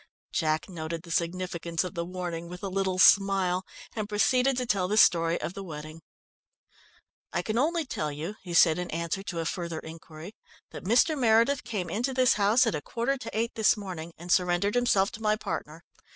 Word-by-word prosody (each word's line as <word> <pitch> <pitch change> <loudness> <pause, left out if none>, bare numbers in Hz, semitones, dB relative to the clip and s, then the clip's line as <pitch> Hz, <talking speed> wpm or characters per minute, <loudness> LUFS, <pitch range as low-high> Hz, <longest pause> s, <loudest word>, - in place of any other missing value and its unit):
Jack 155 -1 0
noted 165 -2 -5
the 170 - -10
significance 170 -1 -2
of 180 - -6
the 170 -2 -3
warning 170 -1 -5
with 180 +2 -9
a 195 - -2
little 190 -1 -1
smile, 190 -1 +4 0.3
and 215 -2 -3
proceeded 250 +5 +2
to 250 - -1
tell 200 -6 0
the 210 +3 0
story 165 -5 +4
of 170 - -4
the 195 - -7
wedding. 155 -2 -8 1.3
"I - - -1
can 220 +2 -1
only 325 +3 +1
tell 155 - -3
you," 160 +8 -5
he 175 -2 -6
said 165 0 +5
in 180 - -4
answer 170 +4 -3
to 190 -3 -6
a 165 - -2
further 170 -1 -3
inquiry, 160 +3 -10 0.4
"that - - -9
Mr. 245 - +3
Meredith 240 +1 +3
came 210 -7 -4
into 240 +9 -2
this 255 -1 +4
house 210 +4 +3
at - - 0
a 150 - -3
quarter 240 - -1
to 250 - -7
eight 230 +1 -1
this 220 0 +3
morning, 180 -5 -7
and 175 +2 -7
surrendered 180 +3 +2
himself 215 -5 +2
to 230 -2 -10
my 215 -1 +2
partner. 170 -6 -6
185 Hz, 195 wpm, -28 LUFS, 170-220 Hz, 1.3 s, said